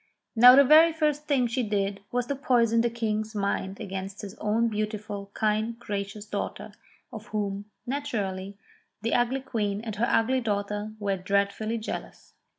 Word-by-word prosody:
Now 245 +2 +9
the 280 - +8
very 315 +4 +7
first 300 -1 0
thing 270 -4 +2
she 240 +2 -1
did 200 -2 -1
was 245 0 0
to 280 - -2
poison 235 -4 +3
the 235 - +1
King's 220 -2 -2
mind 200 -1 -2
against 195 +1 -6
his 200 -1 -7
own 220 +2 +1
beautiful, 210 -2 -4
kind, 220 +1 0
gracious 205 -2 -5
daughter, 215 - -5 0.4
of 220 -1 -8
whom, 205 -1 -3 0.2
naturally, 205 -8 -3 0.5
the 230 - 0
ugly 245 +2 +1
queen 210 -6 -2
and 220 -2 -6
her 235 +3 +1
ugly 250 +3 +2
daughter 210 -1 -2
were 200 -2 -1
dread 200 +2 +1
fully 220 +1 -3
jealous. 220 - -7
215 Hz, 160 wpm, -27 LUFS, 200-240 Hz, 0.5 s, Now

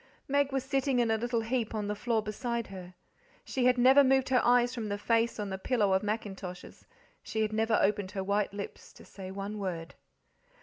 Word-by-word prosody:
Meg 280 0 +2
was 270 -1 -1
sitting 270 -1 0
in 235 -2 +2
a 220 - +2
little 235 0 0
heap 225 -1 -2
on 210 -1 -2
the 210 - -1
floor 220 +1 -1
beside 235 +2 -3
her. 185 -2 -10 0.5
She 255 -2 -1
had 250 0 +4
never 260 +3 +7
moved 265 0 +3
her 255 -1 +4
eyes 245 0 +4
from 225 -4 -4
the 205 - -2
face 230 +2 +1
on 205 -2 -3
the 190 - -4
pillow 205 -3 +1
of 190 - +3
mackintoshes, 195 -4 -6 0.3
she 220 0 -2
had 215 0 -2
never 220 0 +2
opened 200 -1 +1
her 195 -2 -2
white 200 +1 0
lips 200 0 -8
to - - -15
say 190 -2 -9
one 200 +2 -5
word. 175 -4 -4
220 Hz, 210 wpm, -30 LUFS, 200-245 Hz, 0.5 s, never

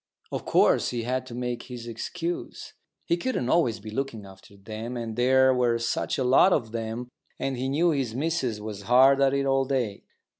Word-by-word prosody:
Of - - -4
course - - +3
he 120 -2 -3
had 130 +2 -2
to 120 - -8
make 125 -1 -3
his 120 -2 -7
excuse. 170 +9 -5 0.3
He 170 - +1
couldn't 175 - -2
always 120 -11 +2
be 110 +1 -9
looking 115 -4 -4
after 95 +1 -15
them, 110 +4 -6
and 115 -2 -5
there 130 +2 +4
were 120 -2 +2
such 115 0 -1
a 135 - 0
lot 130 +9 +5
of 120 -10 0
them, 115 +1 -4 0.3
and 135 -1 -2
he 130 +2 -2
knew 165 +5 +2
his 130 -6 -2
missus 135 -6 -1
was 105 -1 -6
hard 135 +2 +6
at 135 0 +3
it 140 0 0
all 135 0 +2
day. 125 -7 -2
125 Hz, 195 wpm, -26 LUFS, 115-135 Hz, 0.3 s, hard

